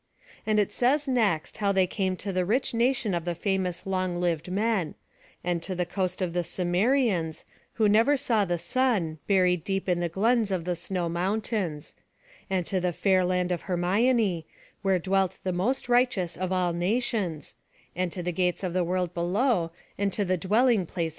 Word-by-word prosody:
And 215 -1 +2
it 205 - +1
says 285 +4 +2
next, 215 -11 0
how 200 -1 +1
they 190 -1 +3
came 185 0 -1
to 195 +1 -4
the 185 0 +1
rich 230 +9 0
nation 235 -3 +1
of 170 -1 -1
the 175 0 -2
famous 185 -2 -2
long 185 -2 -1
lived 170 -1 -1
men; 200 -4 0 0.5
and 175 -1 -1
to 185 +2 -4
the 180 0 -1
coast 185 +1 -2
of 175 -2 -2
the 175 0 0
Cimmerians, 180 - 0 0.3
who 220 -2 +2
never 225 +8 +4
saw 235 -6 +1
the 175 -2 -1
sun, 175 - 0
buried 180 -4 +3
deep 195 0 -2
in 175 -1 +1
the 175 -1 -1
glens 220 +5 +2
of 185 -4 -2
the 180 -1 -1
snow 175 +1 -3
mountains; 180 -2 -2 0.6
and 185 -2 0
to 190 - 0
the 180 -1 0
fair 185 +1 +2
land 180 0 0
of 175 - -1
Hermione, 190 0 +1 0.3
where 195 -2 +2
dwelt 190 +1 0
the 185 - -1
most 240 +10 -1
righteous 240 -8 +2
of 185 0 -3
all 180 -2 +1
nations; 185 -3 -1 0.4
and 180 0 -1
to 180 - -4
the 180 - -1
gates 180 +2 0
of 180 -2 -2
the 185 -1 +1
world 180 0 -1
below, 180 +2 +1 0.3
and 200 -1 +1
to 205 - 0
the 185 0 +1
dwelling 210 +2 +2
place - - -26
of - - -23
dreams. 170 -3 0
185 Hz, 195 wpm, -27 LUFS, 175-210 Hz, 0.6 s, never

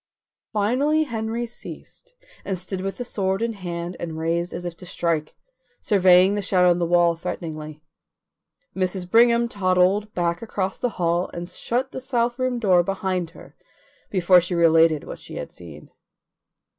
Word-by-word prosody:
Finally 260 +9 +2
Henry 230 -3 -3
ceased 240 - -12 0.3
and 190 -2 -2
stood 185 +1 -4
with 195 +1 -4
the 245 - -4
sword 195 -2 -1
in 230 0 -1
hand 175 -3 -5
and 165 -2 -5
raised 170 +2 -1
as 175 - -6
if 175 -1 -5
to 165 - -13
strike, 165 -3 -2 0.4
surveying 185 -1 +5
the 205 - -1
shadow 180 -2 +3
on 175 - +1
the 170 - 0
wall 175 0 +3
threateningly. 155 -2 -6 0.9
Mrs. 185 -1 -2
Brigham 235 +3 +4
toddled 195 0 +1
back 170 -1 -1
across 195 -4 -3
the 245 - 0
hall 175 +1 0
and 175 0 -5
shut 250 +7 -2
the 260 - -6
south 240 -1 -1
room 255 -1 0
door 190 -6 +4
behind 185 -1 -2
her - - -14 0.5
before 180 -1 +5
she 180 +1 -2
related 165 -2 +4
what - - -8
she - - -10
had - - -6
seen. 80 -4 -12
185 Hz, 160 wpm, -23 LUFS, 170-220 Hz, 0.9 s, surveying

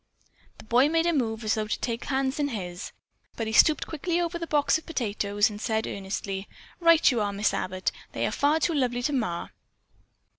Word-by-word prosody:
The - - -12
boy 245 +6 +4
made 330 +1 +2
a 340 - +2
move 225 -6 -1
as 215 - +1
though 215 -1 -1
to - - -2
take 235 -1 -2
the - - -9
hands 270 0 0
in 290 - +1
his. 185 -7 -5 0.4
But 225 - -3
he 220 - -4
stooped 305 +6 +5
quickly 335 +2 -2
over 340 0 -2
the 335 - -4
box 295 +1 +2
of - - -21
potatoes 205 -7 0
and 210 0 -8
said 220 -1 0
earnestly: 195 0 -4 0.3
"Right 335 -3 +5
you 235 -3 0
are, 205 -1 0
Miss 205 +1 0
Abbott. 185 0 -2 0.2
They - - -1
are - - -1
far 295 +3 +2
too 335 +1 +1
lovely 245 -4 0
to 295 - 0
mar." 220 -10 -2
240 Hz, 215 wpm, -27 LUFS, 210-300 Hz, 0.4 s, stooped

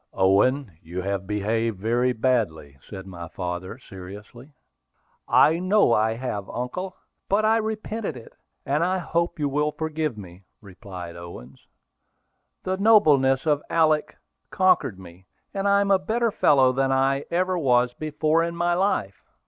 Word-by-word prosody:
"Owen, 100 - +2
you 90 +3 -6
have 100 -1 -3
behaved 110 +1 -1
very 120 +5 +1
badly," 110 - -1
said 95 -2 -8
my 85 -3 -8
father 90 +4 -5
seriously. 105 +5 -12 0.8
"I 160 +3 +4
know 185 - +3
I 110 +1 +2
have, 115 -5 -5
uncle; 180 +10 -5 0.3
but 210 +2 +2
I 220 - +4
have 220 - -1
repented 215 - -4
it, 115 - -13 0.3
and 145 +4 +1
I 185 +2 +1
hope 170 -1 -2
you 150 -2 0
will 150 +2 0
forgive 155 -5 -3
me," 90 -2 -11 0.2
replied 95 -4 -10
Owen. 85 -8 -10 1.1
"The 185 0 -2
nobleness 150 -11 +4
of 150 -2 +2
Alick 155 -2 +1 0.3
conquered 180 - +2
me, 90 0 -14 0.3
and 200 0 -1
I 200 0 +4
am 200 0 0
a 195 - +5
better 225 +5 0
fellow 135 -8 +4
than 135 +1 0
I 135 +1 +1
ever 185 +2 0
was 125 -4 +2
before 155 +3 0
in 170 0 -3
my 175 0 +1
life." 175 - -1
130 Hz, 150 wpm, -24 LUFS, -, 1.1 s, a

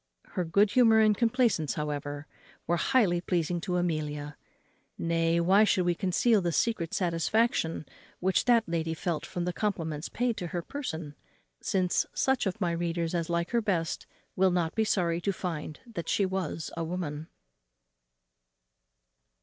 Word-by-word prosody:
Her 180 - -2
good 200 +5 +3
humour 225 -2 +5
and 215 -1 +5
complaisance, 230 - +1
however, 145 -1 -4 0.4
were 175 - +1
highly 190 -7 +2
pleasing 175 -1 -1
to 180 +1 -1
Amelia. 150 -4 -2 0.6
Nay, 165 0 +1
why 190 +5 +5
should 185 -4 +2
we 175 - +3
conceal 195 +4 +2
the 175 -1 0
secret 170 -3 0
satisfaction 170 -1 +1 0.3
which 185 +1 +1
that 235 -4 +4
lady 165 -1 -1
felt 170 -2 -3
from 175 -1 -3
the 180 - -1
compliments 165 -7 -2
paid 245 -2 -1
to 175 - -4
her 175 0 -4
person? 165 - -5 0.5
since 185 -2 +1
such 265 -5 +1
of 190 +3 -3
my 175 -4 +1
readers 170 0 -2
as 170 -1 -1
like 170 0 -1
her 235 -1 +2
best 180 -7 -1 0.3
will 190 0 +4
not 175 -2 0
be 220 - +1
sorry 175 -5 +1
to 200 - 0
find 165 -5 -5
that 210 -9 -6
she 200 - +2
was 185 -4 -3
a 165 - -2
woman. 160 -3 -4
175 Hz, 155 wpm, -29 LUFS, 165-205 Hz, 0.6 s, humour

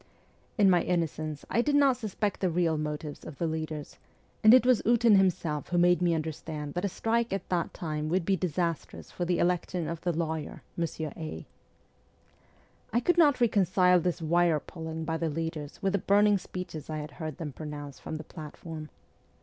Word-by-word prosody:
In 205 -3 +5
my 180 -2 +5
innocence 155 -3 -2
I 235 - +2
did 290 +3 +1
not 280 -3 +5
suspect 215 -3 -2
the 185 - +1
real 165 -1 +1
motives 150 -1 -4
of 145 - -9
the 170 - -1
leaders, 155 -2 -4 0.4
and 215 - +9
it 250 +1 +7
was 255 -3 +4
Ootin 235 -2 +5
himself 170 -6 +1
who 175 - 0
made 175 0 +4
me 175 -2 +3
understand 155 -2 -4
that 175 - -2
a 200 - +1
strike 230 +5 0
at 195 -1 -3
that 175 -2 0
time 155 -2 -3
would 175 0 +1
be 195 - +3
disastrous 170 -2 -3
for 175 - -3
the 175 0 +1
election 175 -1 0
of 165 -1 -4
the 175 - 0
lawyer, 160 -2 -3
Monsieur 160 -2 -3
A. 155 - -6 1.5
I 235 - +3
could 350 +8 +2
not 290 -6 +5
reconcile 185 -5 +4
this 170 -1 -2
wire 170 -1 +3
pulling 160 0 -6
by 160 0 -1
the 165 -1 -1
leaders 155 -1 -4
with 195 0 +1
the 200 - +2
burning 205 +1 +4
speeches 180 -5 -7
I 155 - -3
had 150 -1 -6
heard 155 -3 -6
them 155 -5 -5
pronounce 145 -2 -7
from - - -6
the 155 - -6
platform. 155 0 -8
170 Hz, 190 wpm, -29 LUFS, 155-190 Hz, 1.5 s, and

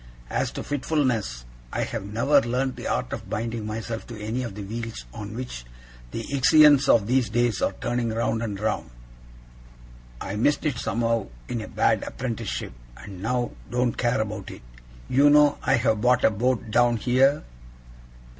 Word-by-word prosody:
As - - 0
to - - -5
fitfulness, 130 - -1 0.3
I - - -1
have - - -4
never 115 +8 +3
learnt 130 +2 -1
the - - -6
art - - -1
of - - -6
binding 115 -1 -3
myself 115 +1 -5
to 115 -3 -8
any 110 +4 -3
of 115 -6 -5
the 105 - -6
wheels 115 - -6
on 105 +1 -7
which 120 - -6 0.5
the - - -5
Ixions 145 0 +6
of 110 -4 +5
these 125 -1 +2
days 120 -1 +1
are - - +1
turning 120 +3 -2
round 110 0 -1
and 105 -4 -3
round. 110 - -2 1.3
I 100 - -4
missed 145 +9 +1
it 135 -5 0
somehow 115 -2 0 0.2
in 120 -2 -3
a 110 - -7
bad - - +2
apprenticeship, 115 - -4 0.2
and 95 -3 -10
now 120 +3 -1 0.2
don't 125 -1 0
care 120 -3 +1
about 105 -2 -5
it. - - -11 0.4
You 140 +3 +5
know 145 0 +5
I 135 - +3
have 110 -3 +1
bought 125 +1 +3
a - - +5
boat 115 0 -1
down 120 +1 +3
here? 130 +5 +3
115 Hz, 170 wpm, -25 LUFS, 110-125 Hz, 1.3 s, Ixions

